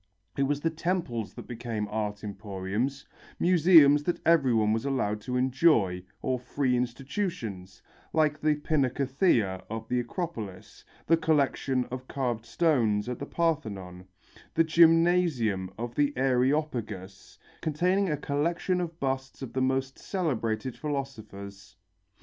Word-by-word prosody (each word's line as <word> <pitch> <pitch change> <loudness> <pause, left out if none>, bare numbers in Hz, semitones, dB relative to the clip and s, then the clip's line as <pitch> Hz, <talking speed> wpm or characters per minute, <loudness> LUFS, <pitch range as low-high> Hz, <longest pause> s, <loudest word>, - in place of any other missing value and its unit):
It - - -1
was 145 0 -1
the 165 - +1
temples 160 - -2
that - - -8
became 115 -3 -4
art 105 -1 -3
emporiums 105 +6 -3 0.3
museums 160 -5 +6
that 175 - 0
everyone 125 -10 +4
was 115 - -1
allowed 120 -7 -1
to 125 +3 -2
enjoy 125 - +3 0.2
or 130 -1 0
free 125 +1 0
institutions, 125 - -4 0.3
like 155 -1 +1
the 155 0 +3
pinacotheca 135 - +1
of 110 0 -5
the 125 - +1
Acropolis, 115 - -6 0.2
the 165 - +4
collection 140 -5 +1
of 130 0 -6
carved 120 -4 -2
stone 120 -11 +2
at 125 -1 -4
the 140 - -5
Parthenon, 100 - -2 0.5
the 165 - +5
gymnasium 165 - +3
of 120 +1 -4
the 145 0 +1
Areopagus, 125 -7 -1 0.2
containing 180 +5 +1
a 150 - 0
collection 170 +6 0
of 170 -1 -5
busts 135 0 -3
of 130 - -7
the 130 - 0
most 130 +1 0
celebrated 130 - -2
philosophers. 105 - -6
130 Hz, 125 wpm, -28 LUFS, 110-155 Hz, 0.5 s, museums